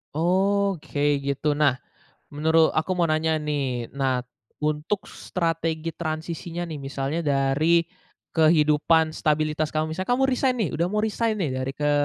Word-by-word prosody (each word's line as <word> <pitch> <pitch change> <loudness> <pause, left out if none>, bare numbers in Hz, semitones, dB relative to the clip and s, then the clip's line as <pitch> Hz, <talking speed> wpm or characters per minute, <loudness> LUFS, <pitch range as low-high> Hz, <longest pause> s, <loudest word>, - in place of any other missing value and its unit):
Oke 180 -4 +1
gitu. 140 +2 -1
Nah, 145 -3 +3 0.5
menuru 160 +2 +3
aku 155 +4 0
mau 175 -2 +1
nanya 155 0 +1
nih. 135 -5 -2
Nah, 135 -2 0 0.4
untuk 155 +8 -2
strategi 165 -2 -2
transisinya 165 +1 -5
nih, 155 - -5
misalnya 140 +2 -3
dari 145 +4 +3 0.5
kehidupan 155 0 +3
stabilitas 155 0 0
kamu, 155 0 -1
misalnya 185 +7 -3
kamu 260 +2 +2
resign 255 0 +1
nih 215 -9 0
udah 170 +6 0
mau 210 +3 0
resign 220 +1 0
nih 180 -8 -1
dari 130 +1 -2
ke 145 0 +1
155 Hz, 140 wpm, -24 LUFS, 145-170 Hz, 0.5 s, Nah